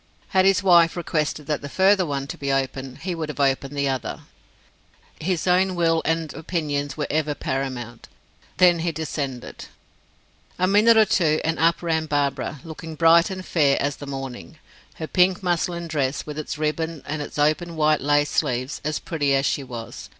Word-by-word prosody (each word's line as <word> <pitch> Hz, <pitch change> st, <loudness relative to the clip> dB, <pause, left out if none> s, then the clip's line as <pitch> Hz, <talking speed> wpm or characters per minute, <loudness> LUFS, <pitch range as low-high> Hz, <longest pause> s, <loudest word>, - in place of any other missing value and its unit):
Had 190 Hz, 0 st, +3 dB
his 195 Hz, 0 st, +3 dB
wife 170 Hz, -3 st, +5 dB
requested 155 Hz, -3 st, -2 dB
that 150 Hz, 0 st, -2 dB
the 140 Hz, -, -7 dB
further 190 Hz, +2 st, +3 dB
one 140 Hz, -2 st, -2 dB
to 140 Hz, -, -6 dB
be 140 Hz, -1 st, -3 dB
opened, 135 Hz, -1 st, -3 dB
he 185 Hz, 0 st, -2 dB
would 160 Hz, -2 st, -4 dB
have 150 Hz, -, -7 dB
opened 135 Hz, +1 st, 0 dB
the 140 Hz, 0 st, +1 dB
other; 130 Hz, -2 st, -3 dB, 1.0 s
his 175 Hz, 0 st, -1 dB
own 185 Hz, +1 st, +2 dB
will 165 Hz, -1 st, +2 dB
and 165 Hz, -1 st, -1 dB
opinions 145 Hz, -4 st, -3 dB
were 150 Hz, -, -1 dB
ever 150 Hz, -1 st, 0 dB
paramount. 130 Hz, -4 st, -4 dB, 0.5 s
Then 180 Hz, -2 st, +5 dB
he 170 Hz, +1 st, -1 dB
descended. 145 Hz, -5 st, -5 dB, 0.9 s
A 185 Hz, -, +2 dB
minute 210 Hz, +4 st, +5 dB
or 220 Hz, -, +7 dB
two, 160 Hz, -6 st, +2 dB
and 160 Hz, 0 st, -1 dB
up 170 Hz, +1 st, +2 dB
ran 160 Hz, -2 st, 0 dB
Barbara, 145 Hz, -1 st, -1 dB
looking 160 Hz, 0 st, -8 dB
bright 165 Hz, +2 st, +5 dB
and 185 Hz, -1 st, -6 dB
fair 145 Hz, -5 st, +2 dB
as 140 Hz, 0 st, -1 dB
the 145 Hz, -, -9 dB
morning, 135 Hz, +2 st, -7 dB, 0.4 s
her 160 Hz, -, -5 dB
pink 180 Hz, +2 st, +2 dB
muslin 175 Hz, -1 st, -1 dB
dress, 140 Hz, -3 st, -1 dB
with 150 Hz, 0 st, -6 dB
its 150 Hz, -, -5 dB
ribbons 155 Hz, 0 st, -2 dB
and 150 Hz, +1 st, -4 dB
its 145 Hz, -, -7 dB
open 155 Hz, +3 st, +1 dB
white 155 Hz, -1 st, +2 dB
lace 145 Hz, +1 st, +2 dB
sleeves, 130 Hz, -2 st, -1 dB
as 150 Hz, +1 st, -1 dB
pretty 145 Hz, -5 st, 0 dB
as 135 Hz, 0 st, +1 dB
she 140 Hz, -, 0 dB
was. 120 Hz, -3 st, -8 dB
155 Hz, 180 wpm, -23 LUFS, 140-170 Hz, 1.0 s, or